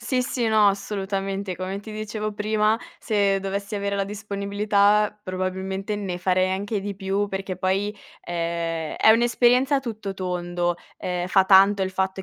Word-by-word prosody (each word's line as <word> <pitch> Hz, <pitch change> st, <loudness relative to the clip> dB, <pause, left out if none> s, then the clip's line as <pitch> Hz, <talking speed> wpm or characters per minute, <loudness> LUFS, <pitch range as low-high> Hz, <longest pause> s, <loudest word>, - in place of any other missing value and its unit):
Sì, 250 Hz, +1 st, 0 dB
sì, 245 Hz, -2 st, -1 dB
no, 215 Hz, -2 st, +5 dB
assolutamente. 195 Hz, -1 st, -3 dB
Come 185 Hz, +2 st, -4 dB
ti 220 Hz, -, -10 dB
dicevo 215 Hz, 0 st, -4 dB
prima, 215 Hz, +1 st, +1 dB, 0.2 s
se 200 Hz, -3 st, +1 dB
dovessi 200 Hz, +2 st, -4 dB
avere 200 Hz, 0 st, -1 dB
la 195 Hz, -, 0 dB
disponibilità, 205 Hz, 0 st, +1 dB
probabilmente, 190 Hz, +2 st, -3 dB
ne 190 Hz, -3 st, -4 dB
farei 185 Hz, +1 st, +2 dB
anche 205 Hz, +3 st, -2 dB
di 200 Hz, 0 st, -4 dB
più. 195 Hz, +1 st, -1 dB
Perché, 195 Hz, -2 st, -4 dB
poi, 190 Hz, +2 st, 0 dB, 0.3 s
ehm, 170 Hz, -2 st, -3 dB
è 220 Hz, -, +5 dB
un'esperienza 240 Hz, +4 st, +4 dB
a -, -, 0 dB
tutto 220 Hz, -6 st, -5 dB
tondo. 175 Hz, -2 st, -2 dB, 0.2 s
Ehm, 180 Hz, -1 st, -2 dB
fa 190 Hz, +1 st, +4 dB
tanto 195 Hz, +1 st, +6 dB
il 190 Hz, -, -1 dB
fatto 190 Hz, 0 st, -2 dB
200 Hz, 155 wpm, -24 LUFS, 185-210 Hz, 0.3 s, tanto